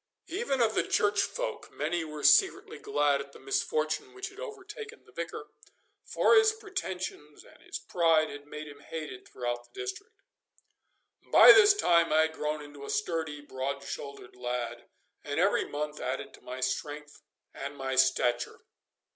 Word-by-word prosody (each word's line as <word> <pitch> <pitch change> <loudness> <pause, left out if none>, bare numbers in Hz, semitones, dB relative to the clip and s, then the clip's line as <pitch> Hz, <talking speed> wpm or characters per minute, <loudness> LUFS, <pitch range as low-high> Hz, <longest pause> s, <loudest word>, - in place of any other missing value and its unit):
Even 335 - -1
of 220 -2 +3
the - - +3
Church 205 0 +2
folk - - -3
many 165 +3 -1
were 150 -2 -7
secretly - - +4
glad 145 -1 +1
at 140 0 -11
the - - -13
misfortune 155 - -1
which 390 +1 -5
had 405 0 -15
overtaken 435 0 -8
the - - -19
Vicar, - - -6 0.5
for - - +3
his 440 -1 +6
pretensions 190 - -6
and - - -19
his - - -6
pride 165 -3 +2
had 145 0 -10
made 150 +1 -7
him 145 -1 -11
hated 150 -4 -7
throughout 120 -1 -4
the 390 - -14
district. 400 +3 -6 1.2
By - - +10
this 410 0 +8
time 170 - +3
I 155 +1 +5
had 160 0 +1
grown 150 -1 -3
into 145 -1 -11
a 140 - -7
sturdy, 155 0 -2
broad 140 0 -4
shouldered 140 -4 -7
lad, 125 -1 -4 0.3
and - - -2
every - - +3
month 150 +1 -4
added 130 +1 -4
to - - -16
my 130 +1 -7
strength 145 +3 -3 0.3
and 140 +1 -6
my 135 -1 -2
stature. 130 -2 +2
150 Hz, 165 wpm, -30 LUFS, -, 1.2 s, By